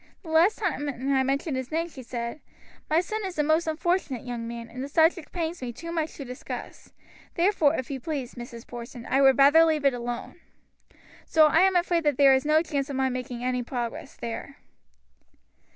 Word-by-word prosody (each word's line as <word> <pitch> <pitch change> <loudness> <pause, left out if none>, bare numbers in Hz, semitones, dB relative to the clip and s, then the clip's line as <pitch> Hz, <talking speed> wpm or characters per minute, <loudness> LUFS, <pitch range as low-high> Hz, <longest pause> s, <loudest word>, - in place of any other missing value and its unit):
"The 330 - -10
last 335 +6 +4
time 310 -8 -2 0.2
I 265 - +3
mentioned 275 +2 -1
his 260 0 -4
name 330 +2 0
she 285 -6 -11
said: 235 +3 -5 0.5
'My 315 +2 +4
son 430 +4 -4
is 375 -3 -5
a 300 - +3
most 315 +2 +2
unfortunate 315 - -1
young 240 -2 -4
man, 235 0 -6
and 255 +3 -7
the - - -4
subject 320 +2 +2
pains 335 -2 -3
me 250 -2 -4
too 335 +8 -8
much 320 -2 -2
to 280 - -7
discuss. 250 0 -8 0.4
Therefore, 335 -4 +3
if 260 -1 -4
you 270 - -3
please, 275 -2 -4
Mrs. 240 -1 -9
Porson, 240 0 -9
I 270 - +2
would 270 -2 +6
rather 285 +4 +7
leave 310 -3 +1
it 275 - +5
alone.' 240 0 -5 0.8
So 315 -1 +5
I 305 +1 +4
am 380 +1 +4
afraid 345 -1 +2
there 280 -2 +5
is 265 +2 +2
no 310 +2 +4
chance 280 -4 -2
of 280 - -4
my 265 0 +1
making 250 -1 -5
any 250 0 0
progress 240 -1 -5
there." 235 +4 -6
280 Hz, 200 wpm, -26 LUFS, 250-325 Hz, 0.8 s, rather